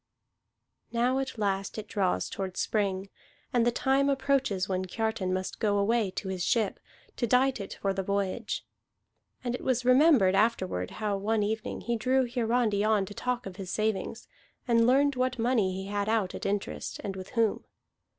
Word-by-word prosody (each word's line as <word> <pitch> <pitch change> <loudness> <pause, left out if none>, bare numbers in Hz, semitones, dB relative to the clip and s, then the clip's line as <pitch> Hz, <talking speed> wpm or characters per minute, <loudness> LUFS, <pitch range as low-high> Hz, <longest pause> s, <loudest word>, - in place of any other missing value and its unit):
Now 245 +3 +2
at 265 -2 -4
last 195 -1 -1
it 215 -1 -5
draws 195 -4 0
toward 190 -1 -5
spring, 195 -2 -1 0.4
and 240 -1 +3
the - - +4
time 270 +3 +2
approaches 270 -8 +1
when 185 -1 -1
Kiartan 220 -1 -2
must 185 0 -3
go 205 -2 +2
away 215 +1 +2
to 190 +1 -5
his 185 -2 -2
ship, 215 +1 +1 0.4
to 240 - 0
dight 255 +2 +3
it 200 - -6
for 195 -1 +2
the 195 - -1
voyage. 200 +3 -2 0.8
And 245 -1 -1
it 250 - -4
was 250 -1 0
remembered 255 - +6
afterward 195 - +1
how 210 -2 -2
one 210 +2 +1
evening 215 +1 -3
he 235 0 -1
drew 260 +3 +2
Hiarandi 235 -3 +1
on 215 -2 +2
to 205 - -9
talk 250 +2 -2
of 190 -1 -8
his 190 -3 -6
savings, 215 0 -2 0.4
and 230 -1 +4
learned 280 +2 +4
what 255 0 0
money 230 -5 +2
he 190 +1 -5
had 205 +1 -1
out 220 -4 +1
at - - -4
interest, 200 0 -3
and 195 -1 -4
with 185 0 -8
whom. 225 -2 +2
215 Hz, 180 wpm, -29 LUFS, 195-245 Hz, 0.8 s, remembered